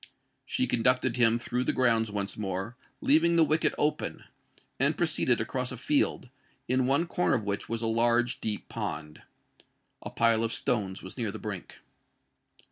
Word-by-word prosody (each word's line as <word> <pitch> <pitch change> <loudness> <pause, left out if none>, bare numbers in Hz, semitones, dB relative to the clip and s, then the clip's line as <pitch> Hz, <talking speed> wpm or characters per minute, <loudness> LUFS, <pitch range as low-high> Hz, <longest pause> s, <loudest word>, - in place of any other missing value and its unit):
She - - 0
conducted 125 +1 +2
him 115 -1 +5
through 125 +1 -2
the - - 0
grounds 115 -3 +2
once 100 -2 -3
more, 95 +2 -4 0.3
leaving 165 +4 +4
the 165 - +6
wicket 155 +1 +1
open—and 150 +1 -3
proceeded - - +2
across 130 -1 -2
a 125 - -6
field, 130 -1 0 0.4
in 130 0 +1
one 140 +6 +2
corner 175 -3 +1
of 115 - -2
which 100 -1 -3
was 115 0 -3
a - - +1
large 120 +2 +2
deep 105 -2 -2
pond. 75 0 -5 0.8
A - - -6
pile 115 -1 +2
of 115 0 -1
stones 100 -5 -1
was 95 +7 -9
near 115 -3 -1
the - - -7
brink. 105 -4 -7
115 Hz, 160 wpm, -28 LUFS, 105-130 Hz, 0.8 s, the